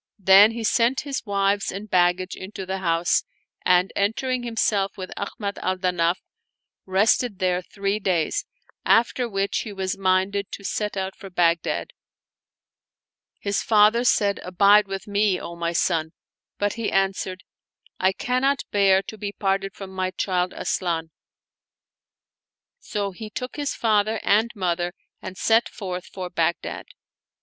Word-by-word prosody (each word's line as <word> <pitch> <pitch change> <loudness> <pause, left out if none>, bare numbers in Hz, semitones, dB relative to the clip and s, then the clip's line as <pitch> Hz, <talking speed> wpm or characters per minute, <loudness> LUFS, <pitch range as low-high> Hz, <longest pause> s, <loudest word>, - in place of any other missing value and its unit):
Then 195 +1 +7
he 230 0 -5
sent 235 +4 +2
his 280 -2 -4
wives 200 0 +1
and 200 +3 -7
baggage 180 0 +2
into 190 0 -7
the 190 +1 -3
house, 170 -1 +1 0.4
and 180 +1 +3
entering 245 +5 0
himself 220 -4 0
with 185 -1 -6
Ahmad 200 0 -5
al 185 0 -1
Danaf, 180 -1 +1 0.7
rested 205 +3 +2
there 180 -1 +1
three 200 +3 -2
days, 180 -6 0 0.4
after 240 +1 +2
which 195 -1 -1
he 215 - -5
was 190 -1 -3
minded 190 +1 +1
to - - -7
set 210 +1 -2
out 190 0 -3
for 195 - -10
Bagh 170 -2 +2
dad. - - -3 1.5
His 200 -1 0
father 215 +2 +4
said, 205 -4 +2
" - - -12
Abide 200 +3 +5
with 195 0 -5
me, 200 -2 +1
O 170 - -7
my 170 0 -2
son! 165 -1 0 0.2
" - - -69
but 205 0 0
he 230 -1 -3
answered, 190 -1 -1 0.3
" - - -61
I 190 +1 +3
cannot 255 +7 0
bear 195 -1 +4
to 220 - -9
be 205 0 -3
parted 195 -1 -1
from 195 -1 -8
my 185 -1 -1
child 185 -1 -1
Asian." 165 -3 -2 1.7
So 205 - -3
he 215 +3 -8
took 250 +4 -6
his 290 -1 -2
father 215 -1 +1
and 220 +3 +3
mother 175 -2 -1 0.3
and 185 - -8
set 225 +1 +3
forth 185 -4 -6
for 180 -2 -7
Baghdad. 170 0 -2
195 Hz, 150 wpm, -24 LUFS, 185-210 Hz, 1.7 s, Then